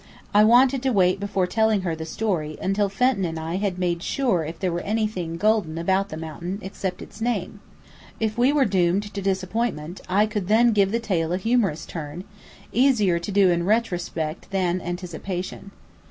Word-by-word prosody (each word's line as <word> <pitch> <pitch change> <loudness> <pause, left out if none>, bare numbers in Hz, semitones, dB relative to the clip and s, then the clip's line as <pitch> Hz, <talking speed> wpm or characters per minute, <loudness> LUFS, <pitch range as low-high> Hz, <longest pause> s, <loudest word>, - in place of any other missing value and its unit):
I 210 +1 +6
wanted 250 +4 +5
to 265 - +1
wait 185 -3 +3
before 200 -2 0
telling 220 +2 +2
her 170 -3 -2
the 160 0 -7
story, 165 -6 -2
until 195 +1 0
Fenton 200 +1 +1
and 165 -2 -2
I 165 +3 -3
had 195 -2 -1
made 175 -2 -1
sure 235 -7 0
if 160 +2 -6
there 185 -2 -1
were 170 - -2
anything 205 -6 -2
golden 205 -5 +1
about 190 +4 +1
the 155 - -6
mountain, 170 +4 -5
except 190 -1 -4
its 215 - -13
name. 215 -4 -2 0.6
If 220 -1 -1
we 245 +3 +3
were 290 -2 +3
doomed 195 +1 +1
to 200 - -4
disappointment 190 -3 -2
I 200 +3 +4
could 210 -4 -3
then 230 +3 +4
give 200 -2 +3
the 230 - +1
tale 175 -7 -1
a - - +1
humorous 200 -6 0
turn, 160 +1 -6 0.5
easier 220 -9 +3
to 170 +4 -5
do 195 -2 +4
in 170 0 +1
retrospect 175 -6 -1
than 185 -2 0
anticipation. 180 +2 -5
190 Hz, 185 wpm, -24 LUFS, 175-215 Hz, 0.6 s, I